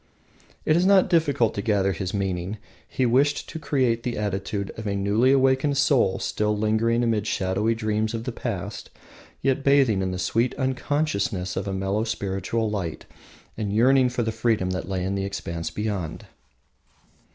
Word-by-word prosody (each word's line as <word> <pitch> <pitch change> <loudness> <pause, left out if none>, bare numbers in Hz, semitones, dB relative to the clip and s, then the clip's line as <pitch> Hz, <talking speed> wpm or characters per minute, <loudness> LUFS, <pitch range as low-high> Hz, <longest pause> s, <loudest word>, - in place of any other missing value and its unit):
It 155 - +3
is 175 - +3
not 195 0 +4
difficult 145 - +2
to 100 - -3
gather 100 -3 +1
his 90 0 -3
meaning. 95 0 -2 0.3
He 130 - 0
wished 135 +5 +2
to 160 - -6
create 130 -6 +1
the 120 0 -3
attitude 100 0 -2
of 110 -1 -6
a 100 - -1
newly 105 +6 +2
awakened 135 +1 +3
soul 135 -9 +3
still 105 0 -1
lingering 110 +3 +1
amid 110 -3 0
shadowy 105 +2 0
dreams 110 0 -1
of 115 - -4
the 125 - -3
past, 115 -6 -5 0.5
yet 135 +1 +1
bathing 135 -8 +4
in 95 - -1
the 90 - -3
sweet 115 +7 0
unconsciousness 130 -9 -1
of 95 +2 -3
a - - -2
mellow 95 +3 -1
spiritual 110 0 -2
light, 95 -7 -4 0.5
and 105 -2 -3
yearning 130 +3 +5
for 120 -1 -1
the 115 - -1
freedom 110 -4 0
that 95 0 -4
lay 95 -2 -2
in 95 - -1
the 100 0 -1
expanse 85 -4 -4
beyond. 100 -7 -4
110 Hz, 170 wpm, -24 LUFS, 95-125 Hz, 0.5 s, yearning